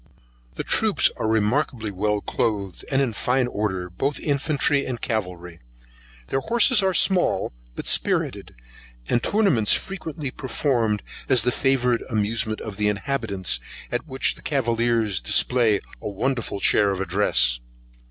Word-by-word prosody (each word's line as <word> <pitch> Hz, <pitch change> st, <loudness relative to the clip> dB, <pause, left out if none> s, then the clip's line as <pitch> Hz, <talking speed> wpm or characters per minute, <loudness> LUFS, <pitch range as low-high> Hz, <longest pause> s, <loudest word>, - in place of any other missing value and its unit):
The -, -, -3 dB
troops -, -, +2 dB
are -, -, -1 dB
remarkably 110 Hz, +1 st, 0 dB
well 105 Hz, +2 st, -1 dB
cloathed, 100 Hz, -6 st, -2 dB
and 135 Hz, 0 st, +2 dB
in 120 Hz, -4 st, -2 dB
fine 125 Hz, +4 st, +1 dB
order, 100 Hz, -6 st, -2 dB
both 135 Hz, +11 st, -2 dB
infantry 145 Hz, 0 st, +1 dB
and 125 Hz, -2 st, -4 dB
cavalry; 90 Hz, -6 st, -4 dB, 0.7 s
the 135 Hz, -, +1 dB
horses 235 Hz, -, +3 dB
are 190 Hz, -1 st, +1 dB
small, 185 Hz, -, +2 dB, 0.2 s
but -, -, -5 dB
spirited, -, -, 0 dB, 0.5 s
and 120 Hz, -, +1 dB
tournaments 185 Hz, -, +3 dB
frequently 160 Hz, -7 st, -3 dB
performed 120 Hz, -6 st, -1 dB, 0.3 s
as 130 Hz, -5 st, +4 dB
the 125 Hz, -, +2 dB
favourite 125 Hz, -3 st, +1 dB
amusement 110 Hz, 0 st, -1 dB
of 105 Hz, -3 st, -7 dB
the 105 Hz, -1 st, +1 dB
inhabitants, 105 Hz, -, -1 dB, 0.3 s
at 120 Hz, +6 st, -3 dB
which 135 Hz, -2 st, 0 dB
the -, -, -15 dB
cavaliers 115 Hz, -, 0 dB
display 115 Hz, -5 st, +2 dB, 0.2 s
a -, -, -4 dB
wonderful 115 Hz, 0 st, -2 dB
share 100 Hz, +1 st, +4 dB
of 95 Hz, -1 st, -2 dB
address. 85 Hz, -11 st, +2 dB
115 Hz, 135 wpm, -23 LUFS, 105-135 Hz, 0.7 s, as